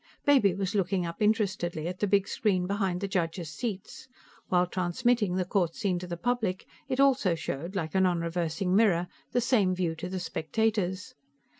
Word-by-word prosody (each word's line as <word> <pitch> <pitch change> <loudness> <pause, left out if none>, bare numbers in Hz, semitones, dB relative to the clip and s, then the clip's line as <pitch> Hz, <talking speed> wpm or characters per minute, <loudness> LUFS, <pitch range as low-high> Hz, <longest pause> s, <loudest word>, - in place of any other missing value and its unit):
Baby 255 -11 +4
was 195 -2 -2
looking 190 -2 0
up 170 +3 -6
interestedly 190 -7 0
at 180 +1 -5
the 205 - +1
big 200 0 +2
screen 185 -5 0
behind 195 -2 -1
the 200 - -1
judges' 170 -3 -2
seats; 215 - -5 0.4
while 180 -1 +3
transmitting 190 +3 0
the 185 -1 0
court 175 -3 0
scene 190 -5 -1
to 180 - -7
the 175 -1 -4
public, 220 -3 -1 0.2
it 260 0 -1
also 265 -10 +4
showed, 165 +4 -5
like 160 -5 -2
a 190 - +3
nonreversing 170 0 0
mirror, 185 -5 +3 0.2
the 245 - +2
same 210 -7 +2
view 175 -3 -1
to 170 +3 -6
the 185 0 -3
spectators. 185 +3 -1
185 Hz, 175 wpm, -28 LUFS, 175-210 Hz, 0.4 s, Baby